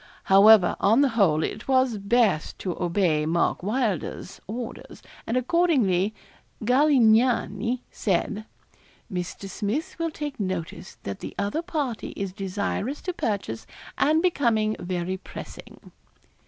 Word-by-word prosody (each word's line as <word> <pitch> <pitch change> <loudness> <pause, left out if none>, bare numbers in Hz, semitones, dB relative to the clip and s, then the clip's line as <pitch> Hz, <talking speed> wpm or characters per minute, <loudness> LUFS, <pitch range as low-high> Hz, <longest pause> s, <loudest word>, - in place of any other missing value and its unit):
However, 200 0 +6
on 225 +6 +4
the 280 - +4
whole, 185 -10 +2
it 215 - -5
was 260 -4 +2
best 200 -5 +1
to 180 -3 -4
obey 170 -4 +1
Mark 170 +1 +1
Wylder's 210 - -2
orders, 230 +3 -7 0.2
and 230 - 0
accordingly 250 - +2 0.5
'Galignani' 245 -3 +3
said: 205 +2 -1 0.7
'_Mr. 180 +2 -4
Smith 210 - -3
will 330 0 0
take 295 -4 -6
notice 185 - -4
that 100 -1 -5
the - - -8
other 205 +11 -1
party 295 -10 -3
is 195 -2 -3
desirous 200 +7 -3
to 365 - -3
purchase, 200 - -3 0.3
and 315 +3 +2
becoming 230 -11 +2
very 180 +1 -3
pressing. - - -11
215 Hz, 120 wpm, -25 LUFS, 185-255 Hz, 0.7 s, However